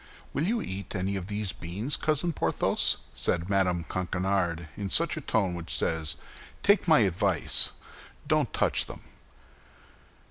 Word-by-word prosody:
"Will 155 +5 0
you 230 +1 0
eat 95 +1 -6
any 95 +1 -1
of 95 -2 -4
these 105 -2 -2
beans, 100 +11 -3
Cousin 155 +2 0
Porthos?" - - +1 0.2
said 90 +3 -1
Mme. 90 -3 +2
Coquenard, 90 -1 -2
in 100 -2 -4
that 160 - +2
tone 100 -6 +1
which 85 -1 -2
says, 80 -2 0 0.5
"Take 200 -2 +3
my 155 -7 +6
advice, 95 -2 +3 0.5
don't - - +1
touch - - +1
them." - - -9
95 Hz, 135 wpm, -28 LUFS, 90-120 Hz, 0.5 s, my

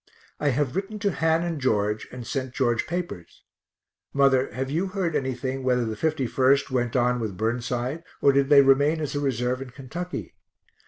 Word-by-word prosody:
I 150 - 0
have 135 -1 0
written 195 +3 -3
to 205 -1 0
Han 160 0 +1
and 165 -4 -3
George 105 -4 0
and 125 -1 -8
sent 130 -1 -4
George 120 -4 +1
papers. 170 - -5 0.7
Mother, 135 -1 +3
have 130 +2 -3
you 170 +6 0
heard 185 -4 -2
anything 130 0 -2
whether 125 -2 +2
the 110 -1 -3
51st 135 0 +1
went 120 -2 -1
on 125 0 +2
with 105 -5 -4
Burnside, 120 +6 -2 0.2
or 140 - +5
did 140 0 +2
they 140 -1 +8
remain 140 +4 +4
as 150 -3 -3
a 145 - -1
reserve 125 -2 -1
in 135 - -7
Kentucky? 145 +8 -6
135 Hz, 175 wpm, -25 LUFS, 125-155 Hz, 0.7 s, they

